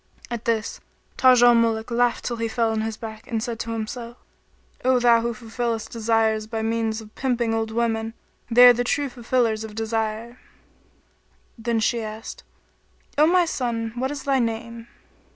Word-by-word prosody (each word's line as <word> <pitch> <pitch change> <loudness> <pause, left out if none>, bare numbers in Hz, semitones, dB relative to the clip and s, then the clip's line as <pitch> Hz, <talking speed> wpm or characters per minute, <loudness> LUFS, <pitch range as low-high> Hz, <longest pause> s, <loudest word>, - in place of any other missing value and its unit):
At 235 -1 -4
this, 225 -2 -1 0.4
Taj 255 -2 +5
al 240 0 +8
Muluk 230 0 +1
laughed 240 0 +1
till 235 - -2
he 230 0 -1
fell 225 0 0
on 220 0 -1
his 220 0 -3
back 220 -1 -9
and 225 -2 -1
said 235 -3 -4
to 230 0 -4
himself, 235 +2 -5 0.7
"O 255 0 +4
Thou 235 -1 +5
who 235 +1 -1
fulfillest 225 0 -3
desires 220 -1 +1
human 220 0 -3
by - - 0
means 225 -1 -1
of 215 -1 -14
pimping 240 -3 -1
old 225 0 -1
women! 225 0 -1 0.3
They 245 +1 +8
are 245 - +10
the 245 +1 -1
true 285 +3 0
fulfillers 235 -2 0
of 215 -1 -8
desires!" 225 +1 -3 1.2
Then 230 0 -1
she 230 +2 +1
asked, 220 +1 -7 0.8
"O 305 - +6
my 355 +1 +4
son, 235 -7 -2
what 260 +2 -1
is 285 -2 -6
thy 275 -1 +2
name?" 230 0 -3
230 Hz, 175 wpm, -23 LUFS, 225-240 Hz, 1.2 s, are